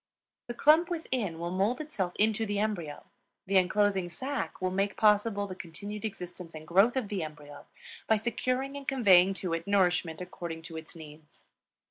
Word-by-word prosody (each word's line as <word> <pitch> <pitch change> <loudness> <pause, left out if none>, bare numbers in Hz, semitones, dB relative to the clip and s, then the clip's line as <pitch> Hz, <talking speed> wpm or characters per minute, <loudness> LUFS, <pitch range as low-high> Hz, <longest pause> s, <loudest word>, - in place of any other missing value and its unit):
The 240 - -5
clump 315 +6 +5
within 255 - -2
will 170 +1 -4
mold 200 +7 +1
itself 205 - -3
into 220 +1 +2
the 205 -2 -2
embryo; 195 -8 -2 0.4
the 195 +1 +2
inclosing 190 0 +2
sac 265 - -4
will 185 0 -1
make 195 +1 -1
possible 210 -1 +3
the 190 - -6
continued 200 +5 -7
existence 180 -4 -7
and 155 0 -9
growth 200 +9 +4
of 250 -5 -1
the 200 -3 -2
embryo 145 -2 -9 0.4
by 220 - +5
securing 255 +5 -1
and 280 -1 -8
conveying 195 -8 +5
to 180 -3 -3
it 165 +2 -3
nourishment 180 -5 +2
according 170 -2 -6
to 165 0 -9
its 160 +2 -9
needs. 155 -1 -14
195 Hz, 170 wpm, -30 LUFS, 170-220 Hz, 0.4 s, clump